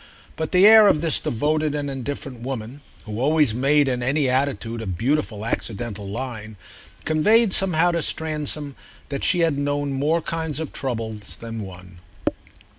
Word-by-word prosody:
But 160 -1 -3
the 185 +2 +6
air 220 0 +9
of 150 - +3
this 165 -3 +2
devoted 150 +5 0
and 145 -1 -2
indifferent 135 -2 -5
woman, 125 +1 -6 0.2
who 105 0 -5
always 150 -2 +3
made, 140 +4 +3
in 125 -2 -1
any 140 +3 +1
attitude, 125 -3 -1
a 110 - -6
beautiful 110 - -1
accidental 110 -3 -4
line, 110 -1 -6 0.5
conveyed 210 +7 +4
somehow 175 -2 +3
to 170 -1 -1
Stransom 150 -3 -2 0.3
that 140 -1 -4
she 180 -3 +3
had 160 -4 +2
known 145 0 -1
more 155 +5 0
kinds 160 -3 -3
of 160 - -5
trouble 115 -4 -3 0.2
than 115 -1 -6
one. 90 -2 -11
140 Hz, 155 wpm, -23 LUFS, 115-155 Hz, 0.5 s, air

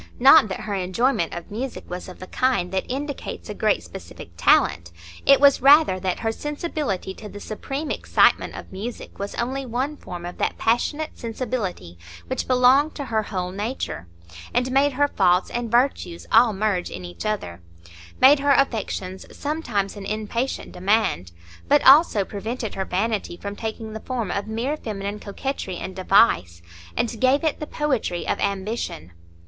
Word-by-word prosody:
Not 265 0 +8
that 190 - -5
her 210 - -4
enjoyment 190 +1 0
of 170 +2 -8
music 245 +4 -5
was 180 +1 -6
of 180 - -11
the 185 - -9
kind 210 -5 0
that 190 0 -2
indicates 280 -3 -5
a - - -3
great 215 0 +1
specific 190 - -10
talent; 85 0 +3 0.4
it 275 - +7
was 280 -1 +5
rather 280 -7 +6
that 185 -1 -2
her 225 - 0
sensibility 295 - -3
to 210 +2 -10
the 205 - -9
supreme 275 +8 -5
excitement - - +2
of - - -10
music 215 +6 -7
was 200 +1 -4
only 260 +3 -2
one 260 +4 -2
form 175 -10 -8
of 175 - -8
that - - -1
passionate 290 +7 0
sensibility 215 - -4 0.3
which - - -3
belonged 260 +4 +4
to 285 - -5
her 220 - +3
whole 180 -3 -4
nature, 205 - -4 0.5
and 250 +1 +1
made 275 +2 +3
her 290 +3 +2
faults 180 -8 +2
and 240 -1 -3
virtues 235 -8 0
all 230 +1 +6
merge 200 -3 -1
in 90 - -7
each 90 0 -8
other; 195 - -3 0.6
made 275 +2 +7
her 285 0 +3
affections 200 -7 -2
sometimes 240 -11 -2
an 200 -1 -7
impatient 220 +5 -3
demand, 180 - 0 0.4
but 290 +1 +4
also 270 - +7
prevented 220 +3 -5
her 190 - -3
vanity 200 -1 -2
from 200 +2 -6
taking 220 0 -5
the 220 - -5
form 230 -6 -3
of 200 +1 -2
mere 235 +7 -2
feminine 205 -6 -5
coquetry 205 -2 -4
and 190 - -6
device, 90 - +3 0.3
and 230 -1 -1
gave 265 +4 +3
it 315 -2 0
the 300 - -5
poetry 260 - -1
of - - 0
ambition. 195 - -3
220 Hz, 165 wpm, -23 LUFS, 190-265 Hz, 0.6 s, Not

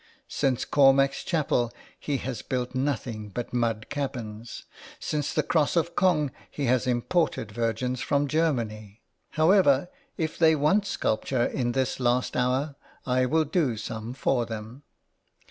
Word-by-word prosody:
Since 130 -3 0
Cormac's 135 0 +4
Chapel 135 -8 0 0.3
he 145 -2 -1
has 125 -2 -5
built 125 0 -3
nothing 125 -5 -2
but 120 +5 -5
mud 115 -3 0
cabins. 120 -6 -5 0.4
Since 150 -1 -2
the - - +1
Cross 155 -2 +1
of 170 0 0
Cong 155 -7 +2 0.2
he 145 - -3
has 130 +1 +2
imported 125 -1 0
Virgins 120 +3 -1
from 140 +2 +1
Germany. 115 -9 -1 0.3
However, 155 -4 +4 0.3
if 160 -3 -3
they 160 -1 +6
want 190 +8 +2
sculpture 120 +3 0
in 120 -2 -1
this 130 0 -1
last 125 0 +1
hour 130 +4 0 0.3
I 130 0 +2
will 160 +3 +2
do 145 -7 0
some 110 +2 -5
for 125 -3 0
them." 110 +4 -7
130 Hz, 140 wpm, -27 LUFS, 120-145 Hz, 0.4 s, they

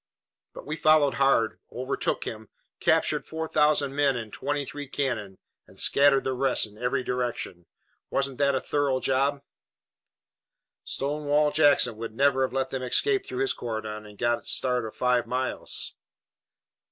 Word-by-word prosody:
But - - -9
we 155 +2 -4
followed 155 -3 +4
hard, 115 -5 +3
overtook 130 +3 -2
him, 110 -1 -7 0.3
captured - - +2
four 160 0 -5
thousand 150 -3 +2
men 140 -3 +2
and 110 -3 -7
twenty 145 +1 -2
three 145 +1 -7
cannon 120 -9 -3 0.3
and - - -17
scattered 140 -1 +4
the 130 - -1
rest 130 -1 +1
in 105 -1 -13
every 125 +3 -1
direction. 120 -9 -3 0.4
Wasn't 135 -2 -1
that 140 -1 +3
a - - +1
thorough 140 -3 0
job?" 140 +2 +1 1.4
"Stonewall 150 +1 0
Jackson 145 -6 +4
would 115 -1 -6
never 135 +1 +3
have 130 - +1
let 135 0 -1
them 130 - -2
escape 395 - +1
through 380 +1 -3
his 400 -2 +1
cordon 110 -2 -5
and 105 -1 -14
get 120 +1 +1
a - - -21
start 125 -2 0
of 110 - -8
five 125 -2 +1
miles." 130 +2 -1
135 Hz, 155 wpm, -26 LUFS, 120-145 Hz, 1.4 s, followed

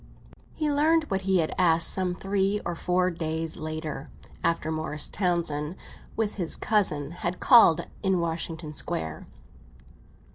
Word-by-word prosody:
V 310 - -1
HE 300 - +1
learned 315 +3 +3
what 195 0 0
he 190 0 +2
had 155 - -2
asked 165 -2 +4
some 185 -2 -1
three 195 +2 0
or 175 - -2
four 180 +2 +1
days 160 -1 -3
later, 155 -2 -5 0.3
after 165 -1 +1
Morris 155 -1 -1
Townsend, 170 -4 -1 0.4
with 220 -2 -1
his 175 -4 +1
cousin, 155 -9 +1
had 175 +1 -4
called 175 - +6 0.2
in 190 -2 +2
Washington 165 -1 -3
Square. 80 - -3
170 Hz, 140 wpm, -27 LUFS, 155-195 Hz, 0.4 s, called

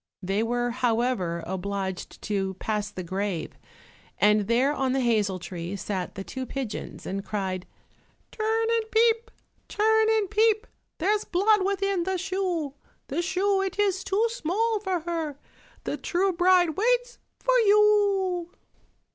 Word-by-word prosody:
They 195 +3 0
were, 240 +1 0
however, 230 -8 0
obliged 190 0 -4
to 195 -2 -1
pass 210 +1 -2
the 185 -3 -6
grave, 190 -1 -3 0.6
and 210 +1 +3
there, 250 +5 +3
on 265 -3 0
the 270 - +1
hazel 215 -6 +1
tree, 175 +1 -6
sat 190 -2 -4
the 195 - -5
two 260 +5 -6
pigeons 260 -6 -5
and 195 +1 -3
cried, 190 -3 -3 0.6
"Turn 445 +1 0
and 450 -1 0
peep, 455 0 +3 0.4
turn 440 +1 +3
and 440 -2 +2
peep, 435 +2 +2 0.3
There's 415 +5 +1
blood 400 +3 +3
within 395 -1 0
the 375 +2 -1
shoe, 355 -6 -2 0.4
The 300 +6 0
shoe 385 +2 +1
it 385 -1 -3
is 390 -2 +1
too 405 +4 +1
small 445 +2 0
for 380 -4 -2
her, 320 -4 -3 0.5
The - - -3
true 370 +2 0
bride 355 0 +4
waits - - 0 0.2
for - - +1
you." 405 -4 +3
345 Hz, 140 wpm, -26 LUFS, -, 0.6 s, bride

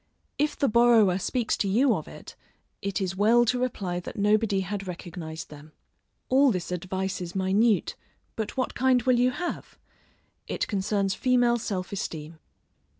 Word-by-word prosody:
If 295 +1 0
the 280 - +2
borrower 225 -5 +4
speaks 240 +4 -1
to 200 - 0
you 240 +6 +3
of - - -4
it, - - -11 0.5
it 200 +1 -2
is 190 -1 -2
well 225 +5 +4
to 250 +2 +1
reply 195 -8 -2
that 180 - -9
nobody 210 -1 +2
had 195 +1 -5
recognised 165 -3 -7
them. 150 +1 -13 0.5
All 270 +2 +5
this 180 -6 -2
advice 185 +2 -3
is 175 +1 -6
minute, 195 +3 +2 0.4
but 220 +3 -4
what 255 - -1
kind 255 -1 +2
will 250 -1 +3
you 250 +1 +4
have? 350 +7 -5 0.7
it - - -2
concerns 195 -1 0
female 245 +1 +2
self 190 -5 -4
esteem. 160 -5 -6
205 Hz, 155 wpm, -26 LUFS, 185-240 Hz, 0.7 s, All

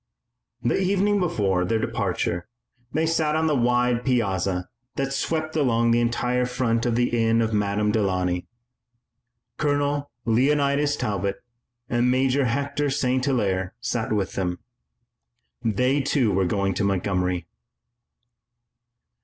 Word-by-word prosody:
The 120 - +1
evening 200 +2 +2
before 100 - +1
their 110 +5 +1
departure 90 -3 -2 0.4
they 160 +2 +1
sat 160 -2 +1
on 160 0 +1
the 155 -2 +2
wide 125 -1 +2
piazza 95 -7 0 0.3
that 135 0 -2
swept 155 +3 -2
along 115 -6 +2
the 120 - +4
entire 125 +1 0
front 120 -2 0
of 120 - +1
the 120 +1 +2
inn 115 -1 +2
of 110 -1 0
Madame 105 0 +1
Delaunay. 90 -4 0 1.1
Colonel 145 -1 0 0.2
Leonidas 140 +4 +2
Talbot 100 -5 -2 0.5
and 120 +1 +1
Major 130 +1 +2
Hector 140 +4 -1
St. 130 -2 0
Hilaire 100 -8 0
sat 115 -2 -2
with 100 -3 -1
them. 90 -2 -2 1.1
They, 125 +6 +1
too, 130 -4 +1
were 95 0 +1
going 95 +1 0
to 95 - -1
Montgomery. 90 -2 0
120 Hz, 125 wpm, -24 LUFS, 100-140 Hz, 1.1 s, the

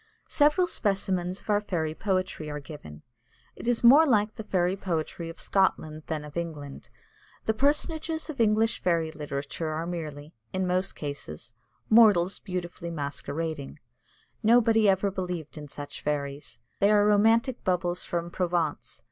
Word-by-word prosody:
Several 300 +5 +4
specimens 190 - -1
of - - -20
our 205 0 +3
fairy 160 -6 -2
poetry 185 -4 -2
are 150 0 -4
given. 140 - -11 0.5
It - - -8
is 240 -1 +1
more 275 +7 +9
like 210 -4 +2
the 220 - -7
fairy 185 -3 +1
poetry 170 -3 -3
of 165 - -10
Scotland 155 -5 0
than 155 -2 -3
of 150 - -12
England. 150 -5 -6 0.6
The 220 - +2
personages 315 +5 0
of 295 -7 -3
English 220 +1 +3
fairy 165 -3 +1
literature 150 +1 -4
are 155 +2 -3
merely, 155 -3 -6 0.2
in 185 0 0
most 185 +2 0
cases, 115 - -7 0.3
mortals 205 -5 +5
beautifully 180 -2 -5
masquerading. 150 -1 -4 0.6
Nobody 225 -2 +5
ever 195 +1 +2
believed 180 -5 -5
in 150 -1 -8
such 145 0 -8
fairies. 145 -1 -3 0.2
They 200 - +4
are 205 -1 +5
romantic 225 +4 +3
bubbles 180 -1 0
from 170 0 -3
Provence. 175 -4 -2
180 Hz, 145 wpm, -27 LUFS, 155-210 Hz, 0.6 s, more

